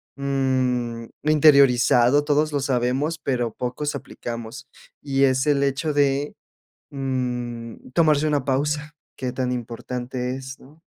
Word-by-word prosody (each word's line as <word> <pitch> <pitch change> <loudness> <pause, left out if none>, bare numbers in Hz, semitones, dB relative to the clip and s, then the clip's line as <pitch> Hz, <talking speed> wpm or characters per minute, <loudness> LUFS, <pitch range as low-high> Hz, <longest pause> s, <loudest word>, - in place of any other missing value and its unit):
mm, 130 -4 -1 0.2
interiorizado, 140 -3 +5
todos 150 +1 +1
lo 145 - 0
sabemos, 135 +4 0
pero 120 -5 -1
pocos 130 +6 -3
aplicamos, 120 0 -7 0.3
y 135 -1 0
es 130 +1 +2
el 140 -1 +3
hecho 140 +3 0
de, 140 0 +1 0.6
mm, 125 -4 -4
tomarse 155 -1 +3
una 145 -3 +1
pausa, 150 +2 -1 0.2
que 130 -1 -3
tan 125 0 -2
importante 125 +1 -4
es, 130 0 -8
¿no? 150 +5 -18
135 Hz, 120 wpm, -23 LUFS, 125-145 Hz, 0.6 s, interiorizado